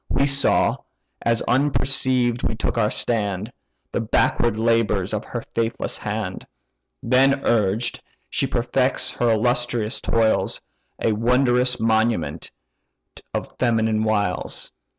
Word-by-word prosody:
We 140 - +2
saw, 140 0 +3 0.4
as 115 -1 +1
unperceived 130 -2 +1
we - - -1
took - - -2
our 110 -3 +2
stand, 105 -2 -2 0.4
The - - -1
backward 115 +1 +1
labours 110 -4 +1
of 105 - -2
her 120 - -5
faithless 115 0 -2
hand. 105 -3 -4 0.6
Then 135 +3 +3
urged, 110 +1 +1 0.3
she - - -1
perfects - - 0
her 120 - 0
illustrious 120 0 0
toils; 115 -1 +1 0.4
A 115 - +1
wondrous 125 +2 +2
monument 110 -4 0 0.8
of - - -5
female 110 -3 +1
wiles! 105 -4 -2
115 Hz, 110 wpm, -22 LUFS, 110-125 Hz, 0.8 s, saw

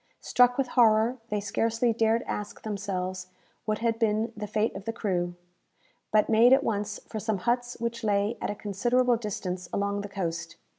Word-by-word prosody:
Struck 245 0 +4
with 270 -2 0
horror, 230 +1 +4
they 210 - 0
scarcely 225 +3 0
dared 225 +1 +2
ask 210 0 -5
themselves 185 -3 -3 0.4
what 215 -1 0
had 230 -1 +1
been 220 0 +1
the 210 0 -5
fate 215 +2 0
of 195 0 -7
the 225 - -1
crew, 175 -5 -1 0.8
but 215 -1 +4
made 230 +3 +6
at 270 +1 +4
once 210 -2 -2
for 215 - -5
some 215 -1 -1
huts 240 +4 -1
which 235 0 -3
lay 205 +1 +1
at - - -2
a 205 - -2
considerable 240 +5 +1
distance 185 -5 -4
along 200 0 -1
the 205 - -7
coast. 170 -3 -4
215 Hz, 180 wpm, -28 LUFS, 200-230 Hz, 0.8 s, made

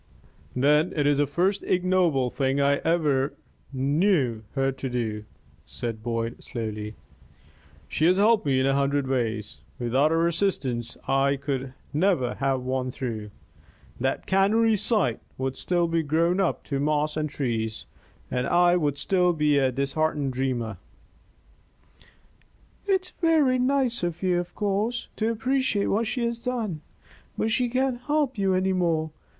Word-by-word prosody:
"Then 150 +6 +3
it 145 -2 +1
is 145 -1 +3
the 145 - +3
first 185 +8 +1
ignoble 180 -8 +1
thing 135 0 0
I 140 0 +3
ever 150 -5 +1 0.4
knew 140 - +1
her 135 0 +1
to 135 0 -5
do," 110 -4 -3 0.4
said 115 -2 -6
Boyd, 115 0 -3
slowly. 110 -2 -5 0.9
"She 155 - +1
has 180 +1 +4
helped 215 +2 +4
me 130 -2 +3
in 130 - +2
a 135 - +3
hundred 140 0 +1
ways. 115 -5 -2 0.2
Without 130 +5 +2
her 165 +1 +2
assistance, 135 -10 -1
I 135 +1 +2
could 135 -2 -4 0.2
never 150 -7 +2
have 135 -1 0
won 130 0 -1
through. 115 -5 -5 0.7
That 135 +2 -1
cannery 215 +4 +3
site 205 - +1 0.2
would 130 0 -2
still 175 -1 0
be 165 0 +1
grown 165 +4 +1
up 190 - 0
to 140 -2 -3
moss 150 +1 0
and 155 0 -1
trees, 115 -6 -3 0.5
and 125 0 -1
I 175 0 +4
would 145 -4 0
still 180 0 +2
be 150 -2 +2
a 130 -1 +2
disheartened 140 +1 -1
dreamer." 125 -5 -2 2.1
"It's 380 -2 +1
very 310 -7 +2
nice 255 -2 +1
of 175 0 -3
you, 180 -1 +2
of 175 - -6
course, 210 +4 -1
to 220 +1 +1
appreciate 230 -2 0
what 225 +2 +1
she 245 0 -1
has 235 0 -3
done. 220 -11 -2 0.6
But 220 - 0
she 245 +2 +1
can't 255 0 0
help 290 -4 0
you 190 -1 +2
any 190 +1 +1
more. 165 -4 0
150 Hz, 150 wpm, -26 LUFS, 130-195 Hz, 2.1 s, has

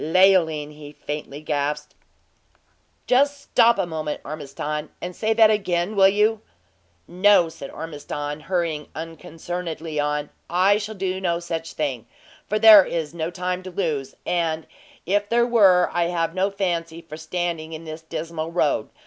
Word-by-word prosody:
"Leoline!" 160 -3 +3
he 150 -1 -11
faintly 145 -1 -6
gasped. 150 0 -2 1.1
"Just 280 +3 +3
stop 235 -3 +3
a - - +1
moment, 155 -3 -4
Ormiston, 150 +1 -5
and 180 0 -6
say 220 0 -1
that 220 -1 +6
again 190 -1 0
will 195 -1 +7
you?" 210 +2 +2 0.7
"No," 180 -1 +4
said 140 -3 -9
Ormiston, 145 -1 -6
hurrying 165 -2 -2
unconcernedly 165 0 -6
on; 150 0 -1 0.2
"I 190 +4 +3
shall 215 +1 -6
do 190 -1 -3
no 170 -2 0
such 165 -1 -5
thing, 130 -7 -3 0.4
for 215 - 0
there 215 -2 +9
is 165 -3 -3
no 165 -1 -3
time 180 +1 -3
to 185 - -8
lose, 160 -7 -3
and 165 -2 -1 0.4
if 205 +3 0
there 235 0 +3
were 195 -7 +4
I 175 -1 +1
have 165 -1 -1
no 190 +2 +1
fancy 170 -4 -3
for 155 -1 -9
standing 160 0 -3
in 160 +1 -7
this 160 0 -8
dismal 160 0 -5
road. 160 -4 0
170 Hz, 150 wpm, -23 LUFS, 155-190 Hz, 1.1 s, there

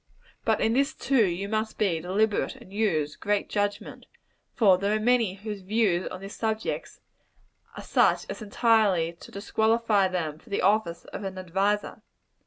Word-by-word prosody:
But - - +2
in 225 - +2
this, 275 +3 +1
too, 255 -7 +2
you 180 +3 -3
must 220 +1 -2
be 185 -6 +1
deliberate, 200 +5 0
and 190 - -15
use 160 -9 0
great 205 0 -1
judgment; 205 -1 -3 0.5
for 195 -6 +5
there 200 +2 +1
are - - 0
many 230 -4 +2
whose 205 0 -6
views 190 -2 +1
on 185 - -7
this 195 +1 -8
subject 220 -1 -3 0.8
are - - -7
such - - +2
as - - -7
entirely 205 -6 +2
to - - -13
disqualify 220 0 +1
them 160 -5 -3
for 235 - -20
the 200 - -1
office 195 -4 +1
of - - -5
an 190 -1 -5
adviser. 195 +3 -1
205 Hz, 165 wpm, -27 LUFS, 185-220 Hz, 0.8 s, for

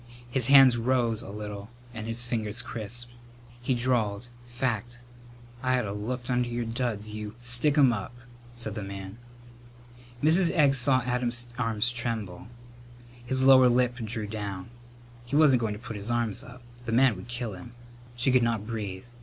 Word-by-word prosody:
His 125 -1 +2
hands 135 -3 +7
rose 120 -2 +1
a - - -9
little 105 0 -7 0.2
and 110 -1 -6
his 115 +1 0
fingers 110 -2 -3
crisped. 120 +2 -2 0.5
He 125 +1 0
drawled, 120 -2 -1 0.2
"Fact. 120 -1 -3 0.6
I 130 0 +2
ought 125 - -1
have 100 0 -4
looked 120 +4 -4
under 125 -1 +1
your 120 0 -2
duds, 115 -3 -3
you 105 0 -6
" - - -22
"Stick 120 +5 +2
'em 135 -4 +6
up!" 100 -2 -5 0.4
said 115 -3 -1
the 105 - -5
man. 100 +2 -8 1.0
Mrs. 165 +3 +5
Egg 145 -3 +5
saw 130 0 +3
Adam's 120 -1 -1
arms 115 -1 0
tremble. 115 -7 -4 0.8
His 130 +1 0
lower 130 -1 +7
lip 125 0 +2
drew 110 -2 -4
down. 105 -2 -6 0.5
He 120 +4 -4
wasn't 145 -5 +5
going 110 -2 -1
to - - -7
put 115 -1 -8
his 100 +2 -5
arms 120 -3 0
up. 125 0 -13 0.2
The - - -1
man 125 0 +4
would 95 +4 -10
kill 120 -2 -4
him. 95 +6 -11 0.4
She 120 +2 +1
could 125 0 +4
not 115 -3 0
breathe. 105 -5 -5
120 Hz, 170 wpm, -27 LUFS, 110-125 Hz, 1.0 s, hands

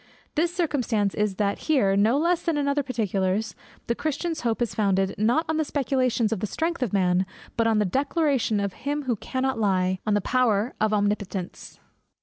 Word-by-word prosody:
This 335 +3 +1
circumstance 250 - 0
is, 210 -2 0
that 200 0 0
here, 205 -11 +3
no 215 +6 +3
less 340 +3 +2
than 330 -3 -1
in 285 -1 0
other 280 +1 +2
particulars, 210 -5 -1 0.3
the 235 - 0
Christian's 310 +5 -3
hope 230 -2 0
is 240 -4 -1
founded, 195 -2 +1
not 240 +10 +2
on 315 0 0
the 315 - +2
speculations 255 -6 0
or - - -2
the 210 - -3
strength 330 - -2
of 245 -6 0
man, 185 -2 +2 0.3
but 230 0 +2
on 225 -1 +3
the 210 - +2
declaration 275 - +1
of 200 -2 -2
Him 290 +5 -3
who 250 -3 0
cannot 260 +3 -2
lie, 185 -3 +1
on 210 - +3
the - - +3
power 235 -1 +1
of 215 0 +2
Omnipotence. 205 -3 -2
230 Hz, 190 wpm, -25 LUFS, 200-280 Hz, 0.3 s, here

